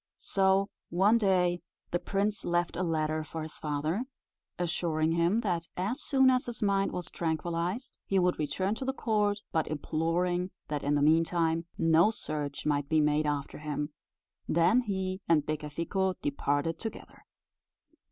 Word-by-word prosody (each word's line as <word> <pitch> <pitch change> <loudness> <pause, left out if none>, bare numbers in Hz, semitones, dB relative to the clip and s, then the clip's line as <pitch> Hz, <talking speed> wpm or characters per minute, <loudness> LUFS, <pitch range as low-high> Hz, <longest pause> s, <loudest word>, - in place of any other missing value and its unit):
So, 195 0 +2 0.2
one 200 +7 +4
day, 180 -4 +2 0.3
the 175 - +1
prince 200 +2 -1
left 175 0 0
a - - -2
letter 155 -2 0
for 160 +1 -6
his 155 - -8
father, 155 - -1 0.5
assuring 165 -2 0
him, 170 +7 +2
that 175 -6 -1
as 215 +11 -2
soon 265 -3 +4
as 255 -1 +1
his 240 -2 -5
mind 195 -1 +2
was 180 -2 -4
tranquillized 170 - -2
he 195 - +1
would 180 -1 +2
return 170 +7 0
to 225 - -5
the 265 +1 -2
court, 210 -4 +1
but 160 -1 +1
imploring 170 +4 0 0.2
that 150 -1 -2
in 145 +1 +2
the 145 - +2
meantime 165 +1 +2
no 165 +4 +5
search 150 -9 -4
might 145 -1 0
be 160 -1 +3
made 150 0 +2
after 145 -1 -2
him; 150 0 -3 0.6
then 170 +9 +4
he 190 -4 -3
and 155 -3 +4
Becafico 165 +5 -1
departed 145 +3 0
together. 225 - -8
170 Hz, 150 wpm, -30 LUFS, 155-195 Hz, 0.6 s, no